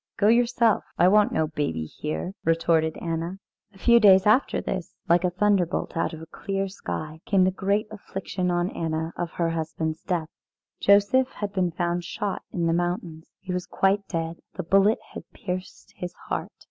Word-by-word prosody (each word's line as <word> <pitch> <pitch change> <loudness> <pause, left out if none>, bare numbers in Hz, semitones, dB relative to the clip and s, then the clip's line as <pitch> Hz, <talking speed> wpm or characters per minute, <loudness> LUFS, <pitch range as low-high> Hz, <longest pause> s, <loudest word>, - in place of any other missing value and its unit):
"Go 205 +1 +4
yourself 235 -1 +3
I 175 - +5
want 210 +2 +5
no 160 - +1
baby 145 - -2
here," 155 - -4
retorted 165 -1 +2
Anna. 165 +2 -3 0.3
A 195 - -19
few 235 +4 +5
days 190 -3 +7
after 215 +6 +3
this, 185 -2 -4
like 175 0 +4
a 180 - +3
thunderbolt 185 -1 +1
out 165 - 0
of 160 0 -8
a 160 - -15
clear 195 0 -2
sky, 160 -4 -6
came 195 -3 +4
the 185 - +3
great 200 +3 0
affliction 190 -3 -4
on 175 +1 0
Anna 160 0 -3
of 175 -1 -3
her 170 -1 0
husband's 160 0 -3
death. 170 -4 -2 0.5
Joseph 205 +7 +4
had 205 -1 -4
been 185 -2 +1
found 175 +1 -1
shot 195 +3 -3
in 170 -2 -1
the 165 - +2
mountains. 175 -2 -2
He 185 -1 -5
was 180 0 -3
quite 195 +1 +1
dead. 165 -1 -3 0.2
The - - -3
bullet 195 +5 +4 0.2
had - - -9
pierced 185 -1 -6
his 180 -1 -6
heart. - - -4
180 Hz, 180 wpm, -25 LUFS, 165-200 Hz, 0.5 s, days